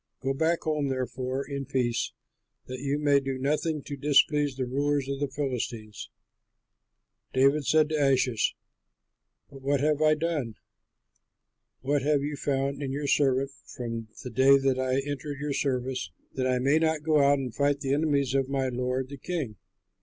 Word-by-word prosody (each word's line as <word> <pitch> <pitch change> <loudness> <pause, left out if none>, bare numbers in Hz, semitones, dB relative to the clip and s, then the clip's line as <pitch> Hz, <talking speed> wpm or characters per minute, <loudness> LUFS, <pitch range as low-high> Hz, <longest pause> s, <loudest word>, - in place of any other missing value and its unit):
Go 135 +1 -1
back 165 +4 +1
home, 150 -2 0
therefore, 130 +1 -3
in 140 -1 -4
peace, 120 -3 0 0.5
that 130 0 -6
you 140 +1 -1
may 145 -1 +4
do 135 -1 -3
nothing 150 +2 -1
to 145 - -6
displease 145 0 +3
the 130 -1 -2
rulers 140 +2 0
of 140 0 -3
the 145 - 0
Philistines." 125 -6 -4 1.2
David 140 +3 +3
said 155 -1 +4
to 145 -3 +2
Achish, 125 -4 +1 1.0
"But 135 - -12
what 140 +1 +1
have 150 +1 +1
I 155 0 +5
done? 150 -8 -2 1.3
What 140 +2 +1
have 145 0 +2
you 145 +1 -2
found 140 0 -1
in 135 -2 -3
your 145 +2 -3
servant 135 -1 +2 0.2
from 115 -3 -4 0.2
the 125 - -6
day 135 +4 +6
that 135 -1 +1
I 130 +1 +1
entered 145 0 -4
your 145 0 -2
service, 130 -8 -1 0.2
that 130 -1 -1
I 130 -1 +2
may 140 +5 +3
not 160 -2 +1
go 155 -1 +3
out 140 +1 +5
and 130 -4 -4
fight 145 0 +1
the 135 -1 0
enemies 140 -3 +1
of 135 -1 +1
my 135 -1 0
lord 125 +1 -2
the 140 - -8
king?" 140 - -4
140 Hz, 170 wpm, -27 LUFS, 130-145 Hz, 1.3 s, day